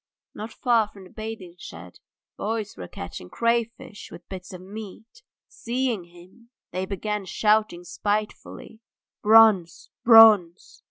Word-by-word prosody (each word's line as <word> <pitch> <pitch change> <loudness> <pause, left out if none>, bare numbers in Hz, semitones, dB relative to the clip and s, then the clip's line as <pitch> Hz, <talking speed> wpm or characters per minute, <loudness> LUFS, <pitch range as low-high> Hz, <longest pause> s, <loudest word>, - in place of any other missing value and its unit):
Not 220 +2 -8
far 230 -2 +1
from 200 -2 -15
the 185 - -16
bathing 215 -5 -8
shed 85 - -12 0.4
boys 215 -1 -4
were 90 - -8
catching 90 +1 -9
crayfish 230 - -2
with - - -13
bits 185 -1 -9
of 180 -1 -10
meat; 215 - -11 0.3
seeing 240 -5 -3
him, 175 +7 -19 0.2
they 185 +1 -4
began 210 +1 -3
shouting 210 -2 +1
spitefully, 210 +3 -4 0.4
"Bronze! 215 -5 +4
Bronze!" 215 -6 +6
210 Hz, 120 wpm, -24 LUFS, 180-225 Hz, 0.4 s, Bronze